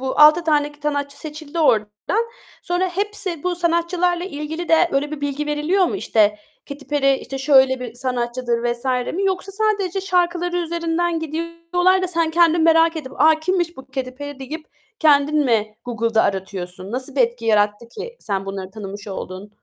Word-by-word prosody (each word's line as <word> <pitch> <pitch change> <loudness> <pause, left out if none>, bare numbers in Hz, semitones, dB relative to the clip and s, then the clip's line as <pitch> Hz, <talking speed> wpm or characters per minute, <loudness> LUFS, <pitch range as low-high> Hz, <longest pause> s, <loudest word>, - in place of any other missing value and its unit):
bu. 265 0 -3
6 305 +3 +7
tane 295 -2 +2
sanatçı 285 -1 -2
seçildi 305 +1 -7
oradan. 220 - +1 0.4
Sonra 360 +1 0
hepsi 390 -3 -3
bu 360 0 0
sanatçılarla 345 +1 +1
ilgili 320 0 -5
de 330 +2 +5
öyle 285 +2 0
bir 305 -2 -6
bilgi 285 +1 -2
veriliyor 305 +6 +2
mu? 395 - -2
İşte, 210 - +2 0.3
"Katy 280 0 -8
Perry, 275 -2 +2
işte, 270 - -6
şöyle 265 -2 +4
bir 240 -2 -6
sanatçıdır." 245 -1 -2
vs. 240 +2 -10 0.3
mi 390 +3 -1
yoksa 385 +1 -1
sadece 400 -3 0
şarkıları 355 -2 0
üzerinden 340 0 -1
gidiyorlar 335 +4 0
da 370 - 0
sen 335 -2 +1
kendin 335 0 +4
merak 325 0 +4
edip 265 -4 -6
"A, 315 +1 +5
kimmiş 345 0 0
bu 265 - -11
Katy 255 -1 -2
Perry?" 285 +1 -8
deyip 305 +4 -7 0.3
kendin 300 -1 +4
mi 215 -3 +1
Google'da 230 -2 +1
aratıyorsun? 190 0 -3
Nasıl 260 +2 -4
bir - - +2
etki 235 -1 +1
yarattı 210 +1 +2
ki 475 - -8
sen 195 -2 -3
bunları 195 -1 -5
tanımış 205 0 -8
oldun? 190 +1 -7
300 Hz, 170 wpm, -21 LUFS, 245-345 Hz, 0.4 s, 6